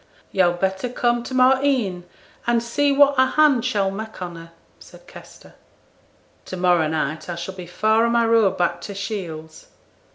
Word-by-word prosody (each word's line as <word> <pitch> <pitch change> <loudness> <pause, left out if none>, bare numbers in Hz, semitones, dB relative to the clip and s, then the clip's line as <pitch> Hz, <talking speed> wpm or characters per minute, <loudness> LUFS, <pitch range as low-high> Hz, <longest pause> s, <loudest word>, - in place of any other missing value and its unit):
'Yo'd 175 -2 +1
better 190 +5 -1
come 240 -1 0
to 255 +2 -7
morrow 260 +1 +4
e'en, 215 -11 0 0.4
and 235 -1 +2
see 285 +5 +1
what 280 0 +5
a 260 - +6
hand 290 -6 +4
she'll 205 -6 0
mak' 220 +3 -8
on 175 -2 -6
her,' 165 0 -12 0.3
said - - -16
Kester. - - -15 0.9
'To 185 - -7
morrow 175 -3 +2
night 155 +1 -3
I 175 - -3
shall 175 +3 -6
be 180 -2 -9
far 220 +5 +2
on 235 - 0
my 235 -1 +3
road 225 -4 +3
back 175 -1 -1
to 200 - -8
Shields.' 165 -6 -7
200 Hz, 175 wpm, -21 LUFS, 175-240 Hz, 0.9 s, a